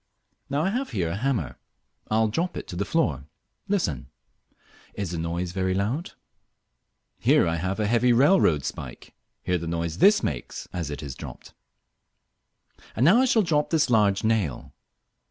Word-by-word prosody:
Now 140 +2 0
I 190 - +1
have 260 +5 -2
here 85 -4 -1
a 85 - -3
hammer. 110 - -2 0.5
I 110 - +1
will 110 0 +3
drop 170 +11 -2
it - - -6
to - - -6
the 100 +3 -1
floor. 100 - 0 0.4
Listen. 170 - -1 0.9
Is 100 -4 -3
the 85 - -3
noise 85 +2 -3
very 95 0 -1
loud? 115 - -2 1.1
Here - - +4
I 80 0 0
have 95 +5 -2
a 105 - +1
heavy 120 +3 +3
railroad 120 - +4
spike. - - -7 0.3
Hear 90 -1 0
the 85 - -6
noise 85 +1 -3
this 205 +1 +5
makes 65 -5 -4
as 85 -5 -3
it 75 +1 -6
is 70 -3 -5
dropped. - - -10 1.4
And 120 - +2
now 180 +9 +6
I - - +4
shall 230 -4 +3
drop 150 -4 +1
this 155 -5 +2
large 105 -3 +3
nail. 110 - -1
100 Hz, 170 wpm, -25 LUFS, -, 1.4 s, now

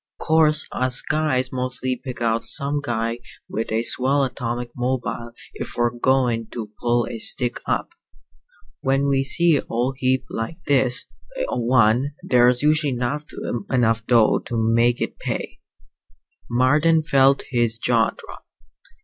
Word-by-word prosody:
"'Course 155 -1 +4
us 130 0 +1
guys 130 -5 0
mostly 130 0 -2
pick 125 0 -9
out 115 0 0
some 145 +1 0
guy 115 -3 -2 0.3
with 110 0 -4
a 110 +1 0
swell 135 +4 +2
atomic 120 -2 -4
mobile 125 -1 -3 0.2
if - - -7
we're 120 0 +1
goin' 120 -2 0
to 110 -3 -7
pull 120 0 +1
a 115 - -6
stick 120 +2 +1
up. - - -1 0.9
When 135 +1 0
we 135 -1 +1
see 165 +3 +4
a - - -4
old 125 +3 -1
heap 130 0 0
like 115 +9 -5
this 130 -3 +2 0.5
one 120 +3 +2
there's 125 -5 +3
usually 150 -2 +2
not 125 +5 -3 0.4
enough 115 -4 +1
dough 115 -3 +4
to 120 - -5
make 115 +2 +2
it - - -4
pay." - - -5 0.9
Marden 150 +7 +3
felt 135 -2 +3
his 120 -3 +1
jaw 115 -1 +2
drop. - - -13
125 Hz, 140 wpm, -22 LUFS, 120-135 Hz, 0.9 s, Course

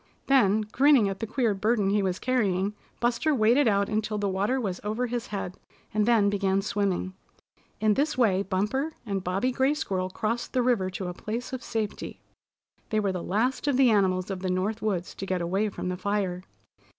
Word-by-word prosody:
Then, 220 -6 +4
grinning 250 +2 +4
at 195 - -5
the 225 - -3
queer 230 -1 +1
burden 205 0 +1
he 205 0 +2
was 185 -2 -1
carrying, 205 -6 0 0.3
Buster 245 +6 +1
waded 240 +4 +4
out 200 -2 +2
until 215 0 -1
the 205 -1 -1
water 200 +7 0
was 195 -7 -3
over 215 +4 -1
his 240 0 -3
head, 195 -3 -5 0.3
and 210 0 +1
then 225 -4 +4
began 195 -1 +1
swimming. 195 -3 -1 0.7
In 215 -1 +3
this 290 +4 0
way 200 -6 +3
Bumper 210 +11 -1
and 195 -3 -2
Bobby 195 +8 0
Gray 265 +3 +2
Squirrel 185 -9 -2
crossed 225 +5 -3
the 255 - +2
river 230 -7 +2
to 185 0 -5
a 180 - -4
place 230 +7 -5
of 255 - -3
safety. 220 -3 -4 0.7
They 215 - +1
were 200 -2 0
the 180 -2 -4
last 240 +11 0
of 280 -3 +2
the 260 -3 +5
animals 190 -2 +2
of 190 - -3
the 185 0 -3
North 195 +5 -1
Woods 190 -5 -2
to 195 - -6
get 185 -1 0
away 190 +5 0
from 185 - -5
the 180 - -3
fire. 190 -2 -1
210 Hz, 200 wpm, -27 LUFS, 190-240 Hz, 0.7 s, the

